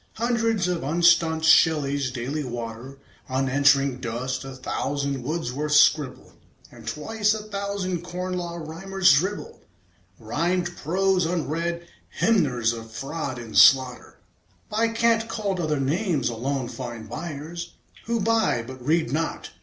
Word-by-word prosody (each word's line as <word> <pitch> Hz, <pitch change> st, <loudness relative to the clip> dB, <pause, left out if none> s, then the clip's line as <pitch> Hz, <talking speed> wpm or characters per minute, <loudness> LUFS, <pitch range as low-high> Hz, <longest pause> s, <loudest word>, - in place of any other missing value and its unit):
Hundreds 230 Hz, -4 st, 0 dB
of 180 Hz, -2 st, -1 dB
unstaunched 165 Hz, +1 st, +3 dB
Shelleys 145 Hz, -4 st, +4 dB
daily 130 Hz, +5 st, -3 dB
water 120 Hz, +1 st, -6 dB, 0.3 s
Unanswering 135 Hz, 0 st, +3 dB
dust; 125 Hz, +3 st, -3 dB
a 135 Hz, -1 st, -8 dB
thousand 140 Hz, +1 st, -3 dB
Wordsworths 150 Hz, 0 st, 0 dB
scribble; 145 Hz, -5 st, +2 dB, 0.4 s
And 115 Hz, -2 st, -14 dB
twice 210 Hz, -, 0 dB
a 215 Hz, -, -6 dB
thousand 200 Hz, -4 st, -3 dB
Corn 180 Hz, +1 st, -5 dB
Law 175 Hz, -1 st, -4 dB
Rhymers 175 Hz, +2 st, +2 dB
dribble 205 Hz, -, -1 dB, 0.6 s
Rhymed 175 Hz, 0 st, -1 dB
prose, 185 Hz, +2 st, +1 dB
unread. 170 Hz, +1 st, -2 dB, 0.3 s
Hymners 130 Hz, -, +2 dB
of 115 Hz, -1 st, -8 dB
fraud 135 Hz, +3 st, -5 dB
and 115 Hz, -3 st, -9 dB
slaughter, 130 Hz, -2 st, +5 dB, 0.5 s
By 220 Hz, +2 st, +1 dB
cant 230 Hz, 0 st, +1 dB
called 200 Hz, -5 st, -2 dB
other 155 Hz, -4 st, 0 dB
names, 160 Hz, -, 0 dB
alone 130 Hz, +3 st, -2 dB
find 120 Hz, -3 st, -7 dB
buyers 165 Hz, +6 st, -7 dB, 0.3 s
Who 235 Hz, -1 st, -1 dB
buy, 220 Hz, -, +2 dB
but 130 Hz, 0 st, -10 dB
read 155 Hz, -2 st, +1 dB
not. 165 Hz, +2 st, -3 dB
155 Hz, 125 wpm, -24 LUFS, 130-185 Hz, 0.6 s, slaughter